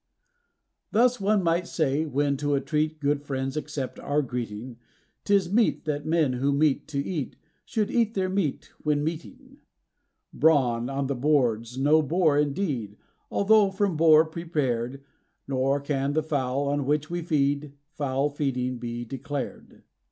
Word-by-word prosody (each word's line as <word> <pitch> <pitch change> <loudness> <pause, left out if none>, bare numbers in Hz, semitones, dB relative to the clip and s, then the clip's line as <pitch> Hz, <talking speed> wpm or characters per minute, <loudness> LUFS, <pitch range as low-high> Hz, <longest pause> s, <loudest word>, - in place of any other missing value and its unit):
Thus, 240 +1 +3
one 200 0 +2
might 170 +1 +1
say, 155 0 0
when 145 0 +1
to 145 0 0
a - - +2
treat 155 +3 -1
good 145 0 0
friends 135 -2 -3
accept 135 -4 -4
our 145 +1 0
greeting, 120 -1 -5 0.5
'Tis 200 -3 +2
meet 225 -6 +2
that 150 -1 -2
men 155 -5 +2
who 135 +3 0
meet 140 0 +1
to 150 - -5
eat 140 -1 -3 0.3
should 215 -2 -1
eat 230 -2 +1
their 190 -1 +1
meat 185 -6 -2
when 150 -1 +1
meeting. 260 - -6 0.7
Brawn 125 -6 +3
on 135 0 -2
the 140 - -1
board's 125 -4 +1
no 150 +4 +4
bore 155 0 +2
indeed 140 - -2 0.3
although 205 0 +4
from 195 -2 0
boar 155 0 +6
prepared; 135 -6 -2 0.4
Nor 135 +1 +1
can 140 0 -1
the 155 +1 +1
fowl, 140 -2 -1
on 145 -1 -1
which 150 +2 0
we 175 0 -2
feed, 145 -2 0 0.2
foul 140 -2 0
feeding 130 -4 -2
he 120 0 -4
declared. 140 +4 -6
145 Hz, 150 wpm, -26 LUFS, 135-160 Hz, 0.7 s, boar